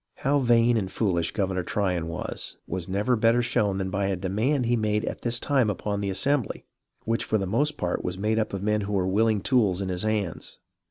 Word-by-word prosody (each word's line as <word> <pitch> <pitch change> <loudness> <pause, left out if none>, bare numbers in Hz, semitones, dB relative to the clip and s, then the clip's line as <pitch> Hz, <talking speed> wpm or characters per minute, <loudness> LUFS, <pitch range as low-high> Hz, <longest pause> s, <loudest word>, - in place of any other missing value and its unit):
How 145 +1 +1
vain 120 -2 +4
and 95 -3 -2
foolish 85 -6 0
Governor 95 -3 -1
Tryon 90 -2 -1
was, 85 - -5
was 95 0 -4
never 105 +6 +1
better 115 +2 +3
shown 105 -4 +1
than 95 -1 -3
by 100 0 0
a 95 - 0
demand 110 +9 0
he 120 +1 +2
made 110 -1 0
at - - -5
this 120 0 +1
time 135 -6 +2
upon 100 0 -2
the 100 - -1
Assembly, 120 +6 0 0.4
which 115 +1 0
for 110 - 0
the 100 - -2
most 145 +10 +1
part 90 -1 -2
was 90 0 -3
made 110 +3 0
up 110 - -1
of 100 -1 -4
men 105 0 +1
who 105 +1 -4
were 95 -2 +1
willing 105 +2 +2
tools 105 -8 +2
in 95 -1 -2
his 90 -1 -2
hands. 105 -5 -2
105 Hz, 220 wpm, -26 LUFS, 95-115 Hz, 0.4 s, vain